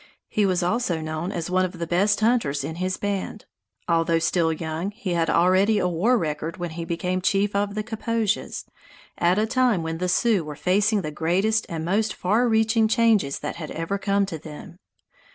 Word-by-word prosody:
He 210 -2 +1
was 180 -1 +1
also 180 -2 0
known 155 +3 -4
as 175 -2 -4
one 185 0 +3
of 180 -1 -3
the 170 - -3
best 200 +5 +1
hunters 215 - +1
in 160 +3 -5
his 185 +1 -2
band. 205 +1 -4 0.4
Although 165 0 +2
still 165 0 +1
young, 160 +3 -3
he 200 -3 -4
had 165 -1 +1
already 185 +5 +3
a 180 - +1
war 190 +9 +2
record 160 -2 -3
when 175 -2 -4
he 165 +1 -5
became 180 +2 -2
chief 200 +2 +1
of 200 0 0
the 215 - -2
Kaposias, 220 -1 -2 0.5
at 175 +2 +3
a 215 - +2
time 240 -6 +1
when 160 0 -4
the 180 0 -1
Sioux 200 0 +2
were 150 -1 -7
facing 200 +6 +2
the 155 - -4
greatest 190 +8 0
and 160 -1 -4
most 210 +5 0
far 220 +7 +1
reaching 220 0 +3
changes 220 - +2
that 150 - -4
had 155 -3 -6
ever 165 +5 -3
come 200 0 +1
to 170 -5 -6
them. 155 +3 -11
185 Hz, 195 wpm, -24 LUFS, 165-210 Hz, 0.5 s, one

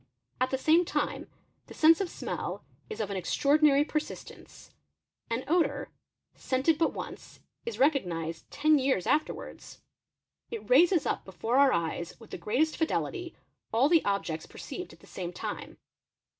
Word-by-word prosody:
At 255 +1 +2
the 265 - 0
same 320 +6 +4
time, 350 - -2 0.4
the - - -11
sense 325 +3 +6
of 380 - -1
smell - - -5 0.3
is 215 - -6
of 205 -2 -2
an 195 - -2
extraordinary 285 - +3
persistence. 305 -1 -6 0.6
An 230 +3 -1
odour, 340 +2 +1 0.4
scented 275 +4 +1
but 330 - +3
once, - - -8 0.3
is 465 - -3
recognised 170 - 0
ten 305 0 +3
years 260 -9 +1
after 305 +1 +2
wards; - - -11 0.7
it 460 - -6
raises 355 - +5
up - - -1
before 225 +6 -2
our 275 -1 +6
eyes 170 -1 -2
with 225 - -15
the - - -6
greatest 290 +9 0
fidelity 345 +2 -2 0.4
all 260 +7 +3
th 330 -2 +6
objects 185 -6 -2
perceived - - -8
at - - -17
the - - -16
same 175 -2 -6
time. - - -6
275 Hz, 155 wpm, -29 LUFS, 205-320 Hz, 0.7 s, sense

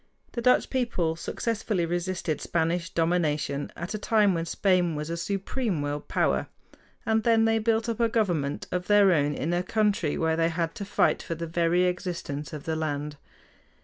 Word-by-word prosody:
The 235 - -4
Dutch 250 +1 +3
people 225 -11 0
successfully 210 +1 -2
resisted 175 -2 -2
Spanish 170 +1 0
domination 155 -4 0
at 170 +4 -5
a 215 - -3
time 210 -2 +3
when 165 -1 -2
Spain 180 -3 +2
was 150 +2 -4
a - - -1
supreme 195 - -2
world 145 0 -4
power, - - +1 0.6
and 220 -1 +2
then 225 0 +4
they 225 0 +3
built 225 +1 +1
up 230 -1 -2
a 230 -1 +3
government 175 -11 0
of 180 0 -2
their 205 -2 +6
own 145 -3 +2
in 165 +4 -2
a 175 - +1
country 205 -5 0
where 160 -1 +1
they 165 0 +2
had 165 0 -2
to 200 - -6
fight 205 - +2
for 165 - -4
the 170 +1 -4
very 170 +2 +2
existence 170 -6 -3
of 150 -2 -7
the 160 - -2
land. 150 -1 -3
175 Hz, 180 wpm, -27 LUFS, 160-210 Hz, 0.6 s, their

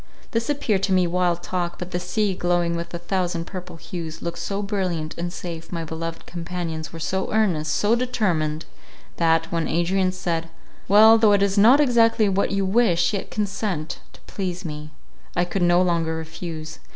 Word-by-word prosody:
This 230 +2 -1
appeared 235 -9 +1
to 195 - 0
me 185 -1 +4
wild 175 0 0
talk; 175 -1 -2
but 180 0 -7
the 175 - -1
sea, 200 +3 0
glowing 175 -1 0
with 170 0 -5
a 170 - -3
thousand 175 -1 -2
purple 180 -2 -8
hues, 165 0 -7
looked 170 0 -5
so 200 +1 -3
brilliant 180 -6 -2
and 175 +1 -3
safe; 170 -2 -7
my 170 -2 -3
beloved 165 +1 -5
companions 170 -3 -5
were 165 - -8
so 190 +4 -2
earnest, 175 -8 +1
so 205 +7 +2
determined, 175 -11 -1 0.5
that, 165 -1 +2
when 165 -1 0
Adrian 185 +3 +1
said, 170 -3 -3 0.4
"Well, 220 +3 +7
though 215 -2 +5
it 200 -1 +4
is 200 -1 +1
not 230 +7 +7
exactly 230 -5 +4
what 195 0 +1
you 195 -1 0
wish, 190 -4 +2
yet 200 - -3
consent, 195 -6 -3
to - - -17
please 185 -2 -5
me"—I 150 +3 -6
could 185 +2 -3
no 175 +1 +4
longer 165 -2 0
refuse. 160 -1 -7
175 Hz, 175 wpm, -23 LUFS, 165-195 Hz, 0.5 s, Well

